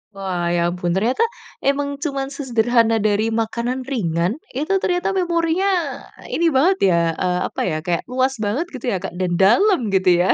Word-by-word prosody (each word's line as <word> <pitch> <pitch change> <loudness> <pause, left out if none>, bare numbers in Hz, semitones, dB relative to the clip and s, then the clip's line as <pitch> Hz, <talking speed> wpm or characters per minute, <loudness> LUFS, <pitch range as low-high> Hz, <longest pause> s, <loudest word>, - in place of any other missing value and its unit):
Wah, 180 -3 -2
ya 175 0 +1
ampun. 175 -1 -3
Ternyata, 240 - +1 0.4
emang 280 0 -1
cuman 275 -2 -3
sesederhana 235 -4 +2
dari 215 +1 +1
makanan 235 +3 -2
ringan. 190 - -1
Itu, 310 +9 -1
ternyata 355 +1 0
memorinya, 345 +1 +1 0.6
ini 335 0 +3
banget 320 +8 +3
ya, 170 - +3 0.2
eee, 180 +1 -1
apa - - -5
ya, 155 - -1
kayak, 175 -2 0
luas 260 +1 +1
banget 220 +10 -1
gitu 250 -1 -4
ya, 195 - 0
Kak, 190 +2 -6
dan 175 -1 -1
dalam, 285 - +4
gitu 190 -1 +3
ya? 180 +2 +3
240 Hz, 170 wpm, -20 LUFS, 190-285 Hz, 0.6 s, dalam